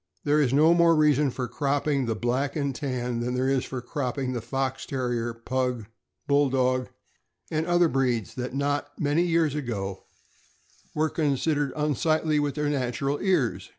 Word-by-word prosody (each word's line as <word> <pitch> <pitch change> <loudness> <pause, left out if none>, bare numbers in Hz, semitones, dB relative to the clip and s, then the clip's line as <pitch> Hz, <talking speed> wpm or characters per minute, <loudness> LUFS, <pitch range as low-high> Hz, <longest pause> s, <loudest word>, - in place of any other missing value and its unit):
There 150 +1 +3
is 130 -4 +2
no 155 +5 +5
more 170 -1 +5
reason 150 -2 +3
for 125 0 -4
cropping 140 +1 0
the 115 - 0
Black 125 +5 -1
and 140 -3 -1
Tan 125 -2 -3
than 125 +1 -2
there 130 +1 0
is 135 -1 +1
for 130 -2 -5
cropping 130 -1 -3
the 120 - -3
Fox 135 +3 -3
Terrier, 120 -3 -2
Pug, 125 0 -2 0.4
Bulldog, 130 -3 +2 0.6
and 160 +1 -1
other 175 0 +4
breeds 125 - 0
that 125 +1 -5
not 145 +1 -2
many 150 +3 +2
years 165 -4 +2
ago 100 -9 -4 0.9
were 155 +1 +1
considered 145 -1 0
unsightly 155 +1 +1
with 145 -1 -1
their 150 -1 -1
natural 140 0 -1
ears. 175 - 0
135 Hz, 155 wpm, -26 LUFS, 125-150 Hz, 0.9 s, no